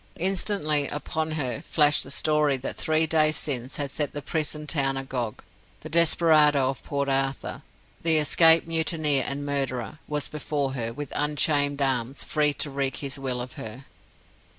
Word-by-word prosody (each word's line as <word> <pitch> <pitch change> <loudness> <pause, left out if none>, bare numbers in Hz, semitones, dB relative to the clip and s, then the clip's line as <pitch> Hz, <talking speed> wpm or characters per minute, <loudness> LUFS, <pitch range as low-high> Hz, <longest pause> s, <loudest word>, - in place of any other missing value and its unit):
Instantly 175 -5 +1
upon 155 +1 -3
her 135 -4 -3
flashed 150 -3 +3
the - - -10
story 150 -1 +2
that 130 - -6
three 160 0 +1
days 155 -1 +2
since 130 -3 -3
had 140 -2 -3
set 150 -1 -2
the 145 - -5
prison 150 -1 -3
town 135 -3 0
agog. 130 -4 -4 0.4
The 155 - -9
desperado 155 -4 +4
of 135 - -11
Port 140 -1 -3
Arthur, 135 0 -2 0.4
the 160 -1 +3
escaped 160 +2 +5
mutineer 160 -4 +1
and 145 +1 -3
murderer, 140 0 -3
was 150 -1 -1
before 145 -2 -3
her, 115 -3 -3
with 145 +3 -7
unchained 145 -1 +1
arms, 130 0 -1
free 150 -1 +2
to 145 - -3
wreak 135 -2 -2
his 140 -1 -4
will 130 -2 -3
of 125 0 -6
her. 115 +5 -9
145 Hz, 160 wpm, -25 LUFS, 135-155 Hz, 0.4 s, escaped